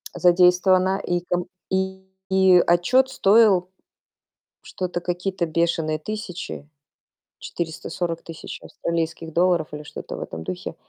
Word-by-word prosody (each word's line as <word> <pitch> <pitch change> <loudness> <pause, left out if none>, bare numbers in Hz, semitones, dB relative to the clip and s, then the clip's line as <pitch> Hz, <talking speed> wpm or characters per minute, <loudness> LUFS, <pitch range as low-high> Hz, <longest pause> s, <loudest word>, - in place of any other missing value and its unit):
задействована, 185 +1 +4
и 175 0 0
ком 175 0 -1 0.2
и, 190 0 -1 0.3
и, 190 -2 +5
отчёт 245 +10 +3
стоил 200 -6 +4 0.9
что-то 180 -1 -4
какие-то 180 +1 -2
бешеные 160 -1 0
тысячи- 180 -5 -6 0.7
440 165 0 -4
тысяч 165 -1 -8
австралийских 165 -1 -4
долларов 175 -1 +2
или 150 - -5
что-то - - -8
в - - -7
этом 80 0 -6
духе. 90 +2 -6
175 Hz, 110 wpm, -23 LUFS, 165-190 Hz, 0.9 s, и